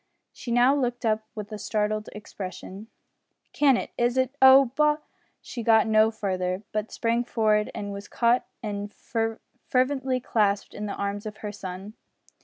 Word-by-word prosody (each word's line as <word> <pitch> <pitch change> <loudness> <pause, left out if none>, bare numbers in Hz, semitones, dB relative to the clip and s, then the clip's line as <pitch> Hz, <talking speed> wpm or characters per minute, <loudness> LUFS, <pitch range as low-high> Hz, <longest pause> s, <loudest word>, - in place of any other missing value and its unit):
She 245 - -9
now 245 +3 +5
looked 245 -3 -1
up 215 0 0
with 210 0 -7
a 210 - -6
startled 215 0 -1
expression. 200 0 -8 0.7
"Can 275 -4 +4
it - - -5
is 240 +1 +1
it 260 +1 +1
oh! 265 -1 +8
Bo 300 0 +3 0.2
" - - -42
she 240 - -6
got 225 0 +5
no 220 0 +4
further, 185 -3 -2
but 215 0 -3
sprang 235 +1 0
forward 215 -3 +1
and 205 -1 -4
was 200 +1 -8
caught 235 +1 +2 0.2
and 205 -1 -4
fervently 255 +4 -2
clasped 205 -4 0
in 210 0 -5
the 200 - -4
arms 200 +1 -3
of 210 0 -8
her 210 - -3
son. 195 0 -8
220 Hz, 165 wpm, -26 LUFS, 205-245 Hz, 0.7 s, oh